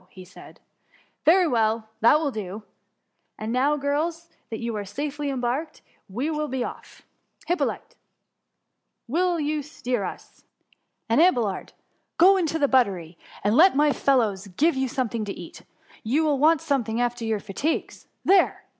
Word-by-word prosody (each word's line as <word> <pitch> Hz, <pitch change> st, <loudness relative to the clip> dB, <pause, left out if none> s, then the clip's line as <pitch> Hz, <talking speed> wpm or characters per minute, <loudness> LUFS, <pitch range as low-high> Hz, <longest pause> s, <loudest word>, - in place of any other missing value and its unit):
so, 185 Hz, -, -10 dB
said 180 Hz, 0 st, -15 dB
he, -, -, -41 dB, 0.3 s
" -, -, -37 dB
very 365 Hz, +2 st, +6 dB
well! 225 Hz, -4 st, +1 dB
that 235 Hz, +7 st, +5 dB
will 300 Hz, -3 st, -1 dB
do, 210 Hz, -2 st, -6 dB, 0.4 s
— -, -, -50 dB
and 215 Hz, +1 st, -4 dB
now 280 Hz, +4 st, +2 dB
girls, 320 Hz, +4 st, -2 dB, 0.2 s
that 225 Hz, -, -4 dB
you 230 Hz, -1 st, -4 dB
are 205 Hz, -, -3 dB
safely 290 Hz, +7 st, -4 dB
embarked, 265 Hz, +4 st, -3 dB, 0.3 s
we 255 Hz, +11 st, -2 dB
will 300 Hz, -1 st, -2 dB
be 260 Hz, -2 st, -2 dB
off. -, -, -9 dB, 0.4 s
Hyppolite! 350 Hz, +1 st, -2 dB, 1.1 s
you 320 Hz, +1 st, 0 dB
will -, -, -2 dB
steer 250 Hz, -6 st, -3 dB
us: -, -, -9 dB, 0.3 s
— -, -, -51 dB
and, 230 Hz, +6 st, +3 dB
Abelard, 240 Hz, -, +1 dB, 0.4 s
go 365 Hz, +3 st, +7 dB
you 395 Hz, -, +3 dB
into 325 Hz, -3 st, 0 dB
the 290 Hz, -3 st, +2 dB
buttery, 190 Hz, -11 st, +1 dB, 0.3 s
and 205 Hz, +2 st, +2 dB
let 360 Hz, +5 st, +6 dB
my 295 Hz, 0 st, +3 dB
fellows 215 Hz, -8 st, +1 dB
give 320 Hz, +1 st, +3 dB
you 265 Hz, 0 st, 0 dB
something 235 Hz, -3 st, -2 dB
to 200 Hz, -, -4 dB
eat; -, -, -10 dB, 0.4 s
you 265 Hz, +8 st, +1 dB
will 295 Hz, -3 st, +1 dB
want 315 Hz, +1 st, +4 dB
something 235 Hz, -5 st, -1 dB
after 245 Hz, -1 st, -1 dB
your 220 Hz, -2 st, -1 dB
fatigues. 215 Hz, +11 st, -3 dB, 0.2 s
There 385 Hz, 0 st, +3 dB
265 Hz, 165 wpm, -25 LUFS, 220-305 Hz, 1.1 s, go